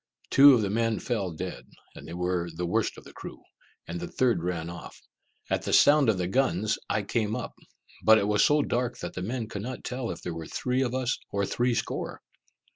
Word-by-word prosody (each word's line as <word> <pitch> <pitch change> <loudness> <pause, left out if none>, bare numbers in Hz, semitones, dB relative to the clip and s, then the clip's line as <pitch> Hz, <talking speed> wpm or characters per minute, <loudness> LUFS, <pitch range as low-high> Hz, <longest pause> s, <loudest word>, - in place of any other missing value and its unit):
Two 140 0 +9
of 115 - +1
the 100 - -1
men 115 0 +1
fell 105 -7 -2
dead, 80 -6 -6 0.3
and - - -11
they 85 - -7
were 90 -1 -1
the 90 +2 -2
worst 85 - 0
of - - -11
the - - -14
crew, - - -10 0.4
and 85 +1 -4
the 85 - -5
third 120 -9 +1
ran 85 -2 -3
off. 85 0 -9 0.5
At - - +1
the - - -3
sound 145 -4 +6
of 105 - +2
the 90 - -1
guns 110 -2 +1
I 105 - 0
came 110 +1 -1
up, 125 - -5 0.5
but 110 0 +7
it 100 -1 +1
was 105 0 +3
so 150 0 +4
dark 125 0 -1
that - - -6
the 90 - -5
men 115 +4 -3
could 100 - -6
not 130 +4 -6
tell 125 -2 -4
if 85 - -6
there 90 - -4
were 80 -1 -7
three 125 +1 -1
of 130 -1 -1
us 130 -2 -1
or 100 0 0
three 120 +4 0
score. - - -4
110 Hz, 225 wpm, -27 LUFS, 90-125 Hz, 0.5 s, Two